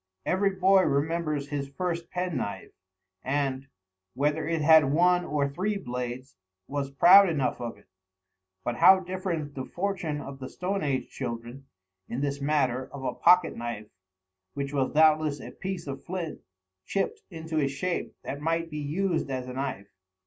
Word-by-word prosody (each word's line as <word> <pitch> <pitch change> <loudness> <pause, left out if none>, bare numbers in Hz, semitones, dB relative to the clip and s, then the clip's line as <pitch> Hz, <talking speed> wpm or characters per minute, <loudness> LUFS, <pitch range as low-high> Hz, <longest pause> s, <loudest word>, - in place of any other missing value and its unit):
Every 195 +2 +2
boy 190 0 +4
remembers 150 -1 0
his 140 -1 -3
first 170 +2 -3
pen 180 -4 -2
knife, 100 - -4 0.5
and, 135 -1 -1 0.5
whether 150 +2 0
it 165 -1 0
had 155 -3 +6
one 180 +3 +4
or 145 -4 0
three 190 +9 -2
blades, 125 - -5 0.3
was 140 -1 -3
proud 185 +8 +7
enough 140 -7 -1
of 120 -3 -5
it; 100 - -23 0.8
but 120 -1 -2
how 190 0 +7
different 175 -5 -3
the 130 - -4
fortune 175 -3 -3
of 140 -1 -8
the 130 - -6
stone 195 +2 -2
age 140 -3 -1
children, 120 +3 -6 0.4
in 125 - -3
this 140 0 -2
matter 130 -3 0
of 140 -1 -8
a - - -1
pocket 180 -1 +4
knife, 115 -2 -6 0.6
which 140 0 -3
was 135 -2 +1
doubtless 155 -1 +4
a - - -8
piece 190 -3 -5
of 135 -1 -6
flint 175 -3 -5 0.4
chipped 415 - -2
into 160 -3 -3
a 140 - +2
shape 155 +6 -3
that 140 - -5
might 165 +1 -1
be 150 - -4
used 165 +3 -1
as 130 -1 -3
a 125 - -6
knife. 130 -7 -4
150 Hz, 165 wpm, -27 LUFS, 135-175 Hz, 0.8 s, proud